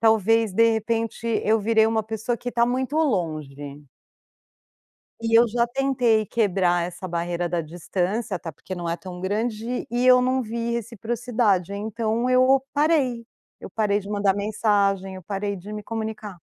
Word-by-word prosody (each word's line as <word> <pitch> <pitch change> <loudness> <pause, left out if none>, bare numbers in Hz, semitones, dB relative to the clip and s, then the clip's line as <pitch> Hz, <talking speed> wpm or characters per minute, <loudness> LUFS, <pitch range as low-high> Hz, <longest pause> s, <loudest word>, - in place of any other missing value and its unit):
talvez 225 -1 +3
de 230 +3 +4
repente 225 +1 -2 0.2
eu 220 +1 +3
virei 220 +1 +3
uma 220 -1 +1
pessoa 220 +2 -3
que 245 - -6
está 235 -1 +2
muito 260 +4 -1
longe. 155 - -2 1.4
E 230 0 +4
eu 240 - +6
já 235 +2 +1
tentei 240 -4 +1
quebrar 185 -6 +1
essa 180 +1 -7
barreira 175 0 -2
da 175 -1 -1
distância, 185 +6 -2
até 165 - -7
porque 185 +5 -8
não 175 -1 -4
é 170 - -1
tão 180 +1 -9
grande, 220 +4 -2
e 245 +1 +1
eu 250 0 +7
não 255 0 +1
vi 235 +1 -3
reciprocidade. 225 -4 -1
Então 220 +3 -1
eu 260 +1 +5
parei, 285 -6 +1 0.4
eu - - -9
parei 210 -2 +1
de 200 - -10
mandar 200 -2 +1
mensagem, 200 -2 0
eu 185 - -9
parei 200 +2 -3
de 200 +4 -9
me 210 0 -5
comunicar. 215 -5 -5
220 Hz, 160 wpm, -24 LUFS, 190-235 Hz, 1.4 s, eu